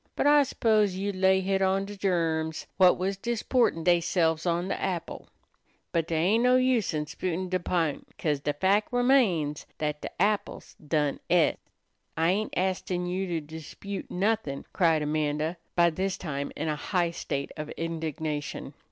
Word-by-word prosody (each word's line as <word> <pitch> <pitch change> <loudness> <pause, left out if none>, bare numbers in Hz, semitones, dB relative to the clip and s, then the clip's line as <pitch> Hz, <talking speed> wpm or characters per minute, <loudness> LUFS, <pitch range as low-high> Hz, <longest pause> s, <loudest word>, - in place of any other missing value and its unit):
But - - 0
I 290 0 +7
s'pose 215 -7 +2
you'd 200 +1 -2
lay 190 0 +3
hit 195 0 0
on 190 +1 +2
de 205 +1 -8
germs 165 -5 -1
whut 185 -1 +6
was 190 +2 -1
disportin' 235 -4 +1
deyselves 170 -1 +2
on 175 +1 0
de - - -2
apple. 175 -3 -3 0.6
But 165 -1 0
dey 165 - -1
ain't 195 +9 +3
no 250 0 +5
use 255 -4 +2
in 150 0 -1
'sputin' 180 +4 -3
dat 185 -1 -1
p'int, 165 -5 0
'ca'se 150 -3 0
de 145 - -1
fac' 195 +8 +1
remains 235 - +2
dat 150 -1 -2
de - - -4
apple's 205 +2 0
done 150 -2 -1
et." - - +3 0.6
"I 165 +2 +3
ain't 210 +3 -1
astin' 180 -1 -1
you 185 +2 -2
to 170 -2 -2
dispute 160 +6 -8
nothin'," 190 -7 -1
cried 165 -4 +3
Amanda, 150 +2 -1 0.2
by 170 -1 +4
this 190 +3 -2
time 140 -6 -4
in 155 - -3
a 155 - 0
high 175 +2 0
state 140 -4 -4
of 150 -1 -6
indignation. 160 -2 -4
175 Hz, 165 wpm, -28 LUFS, 160-195 Hz, 0.6 s, I